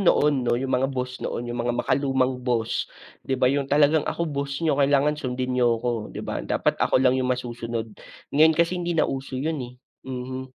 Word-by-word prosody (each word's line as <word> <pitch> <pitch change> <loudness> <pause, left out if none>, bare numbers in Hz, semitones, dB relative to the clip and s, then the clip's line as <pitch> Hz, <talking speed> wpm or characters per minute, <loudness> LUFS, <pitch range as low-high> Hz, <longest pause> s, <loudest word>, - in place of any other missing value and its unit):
noon 145 -8 +3
'no, 120 - +2
yung 130 +1 -2
mga 130 +1 +2
boss 125 -1 -4
noon, 120 0 -4
yung 120 - -3
mga 120 - +1
makalumang 130 -1 +1
boss 115 -3 0 0.4
'di 130 - -1
ba. 125 - +5
Yung 140 0 0
talagang, 150 +1 +4
"Ako 170 - -1
boss 140 0 -3
niyo, 150 -3 +2
kailangan 145 +1 +3
sundin 125 -1 -2
niyo 120 -2 +3
'ko." 120 -3 -2
'Di - - -6
ba. - - -3
"Dapat - - 0
ako - - +3
lang 130 -1 +4
yung 130 -1 0
masusunod." 120 -2 -3 0.4
Ngayon 160 +3 +6
kasi 170 +2 +2
hindi 175 0 -1
na - - +4
uso 135 -1 -4
yun, 155 +2 -2
eh. 120 - -10 0.4
Mhm. 130 0 -5
130 Hz, 205 wpm, -24 LUFS, 125-140 Hz, 0.4 s, Ngayon